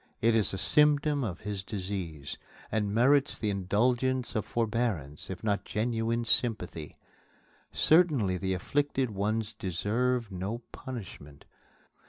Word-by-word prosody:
It 115 +1 +3
is 110 -2 +3
a 95 - -3
symptom 150 +4 +3
of 95 -6 -4
his 100 -2 -4
disease, 95 - -5 0.3
and 105 -2 0
merits 135 +6 +3
the 105 -2 -1
indulgence 120 +6 +1
of 110 - -1
forbearance, 110 - -2
if 95 +1 -6
not 105 -2 0
genuine 115 +1 -1
sympathy. 100 -11 0 0.7
Certainly 145 - +3
the 95 0 -1
afflicted 135 +4 0
one 105 +3 0 0.2
deserves 115 +5 0
no 100 +6 -4
punishment. 95 - -9
110 Hz, 120 wpm, -29 LUFS, 95-125 Hz, 0.7 s, It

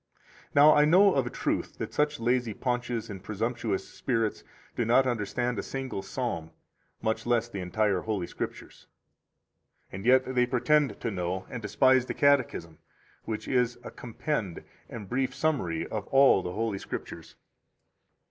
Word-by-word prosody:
18 - - -33
Now 145 +2 +8
I 150 - +5
know 185 +5 +6
of 135 -3 +1
a - - -2
truth - - -2
that - - -5
such 150 0 +1
lazy 120 -2 0
paunches 120 -2 -2
and 95 -2 -8
presumptuous 110 -1 -2
spirits 115 -4 -2 0.3
do 120 - 0
not 120 +4 +4
understand 120 0 -1
a - - 0
single 135 -7 -5
psalm, 95 -10 -4 0.5
much 110 +2 -1
less 120 -1 +2
the 100 -4 -6
entire 95 +1 0
Holy 105 -4 -2
Scriptures; - - -7 1.0
and 95 +1 -7
yet 130 +2 +4
they 125 -1 +3
pretend 135 -1 +2
to 115 - -2
know 90 0 -3
and 120 - -5
despise 130 +4 +3
the - - -4
Catechism, 130 - +1 0.5
which 110 -1 -4
is 125 -2 +1
a - - -8
compend 115 - -4 0.3
and 105 -4 -8
brief 130 +3 -1
summary 90 - 0
of 105 -2 -5
all 135 -7 +5
the 90 -1 -5
Holy 110 -2 -2
Scriptures. - - -7
120 Hz, 155 wpm, -28 LUFS, 105-130 Hz, 1.0 s, Now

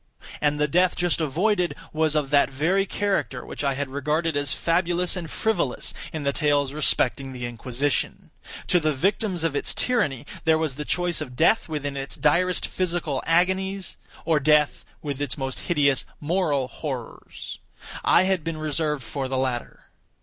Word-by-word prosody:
And 150 0 +2
the 150 - +3
death 180 +4 +3
just 175 -1 0
avoided, 180 +5 +1 0.2
was 155 -1 +2
of 145 -2 0
that 145 -1 +5
very 175 +9 +1
character 195 -13 -1
which - - -6
I 140 -1 +1
had 140 0 -3
regarded 150 +4 0
as 145 -2 0
fabulous 175 +1 +1
and 170 -3 -5
frivolous 220 - -1 0.2
in 155 -2 -4
the 140 0 +1
tales 145 -2 +1
respecting 135 -2 +1
the 125 -1 -5
Inquisition. 125 +3 -2 0.3
To 180 - +3
the 155 -1 +1
victims 190 - 0
of 165 -3 0
its - - 0
tyranny, 180 - +1 0.2
there 160 -1 +4
was 160 -3 -1
the 150 +3 -6
choice 175 -2 0
of 125 - -6
death 170 - +3
with 150 -2 -3
its 140 -1 -4
direst 180 +4 +2
physical 170 -7 -1
agonies, 190 +3 +1 0.3
or 160 -2 +3
death 150 +1 +3 0.2
with 145 -2 -4
its 145 -1 -2
most 135 -2 -3
hideous 140 -5 +3 0.2
moral 150 -5 0
horrors. 130 -4 -7 0.4
I 175 - +5
had 190 -3 +1
been 165 0 -3
reserved 150 -2 -1
for 135 +2 -3
the 130 0 -2
latter. 130 -2 -2
150 Hz, 165 wpm, -25 LUFS, 140-175 Hz, 0.4 s, that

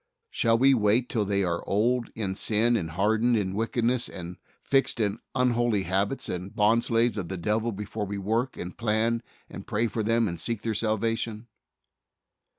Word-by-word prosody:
Shall 115 -1 +2
we 135 +3 +5
wait 115 +1 +2
till 110 -3 0
they 100 0 +1
are 85 -1 -1
old 120 +4 +1
in 100 -4 -2
sin 115 +4 +2
and 85 -8 -1
hardened 110 +7 +2
in 95 -3 -1
wicked 115 +3 -1
ness 125 0 +1
and 90 0 -8 0.2
fixed 135 -3 +1
in 105 -3 0 0.2
unholy 120 -5 +2
habits 100 +8 -1
and 90 +2 -5
bond 110 +3 +3
slaves 115 0 +2
of 90 -4 -4
the 95 - -3
devil 110 +6 0
before 105 0 -5
we 100 +1 -4
work 115 +6 -1
and 90 - -6
plan 115 +1 0 0.3
and - - -10
pray 110 +3 0
for 110 0 -2
them 115 +1 +2
and 85 -3 -4
seek 115 -3 -2
their 115 - -1
salvation? 110 +1 -1
110 Hz, 180 wpm, -27 LUFS, 100-115 Hz, 0.3 s, we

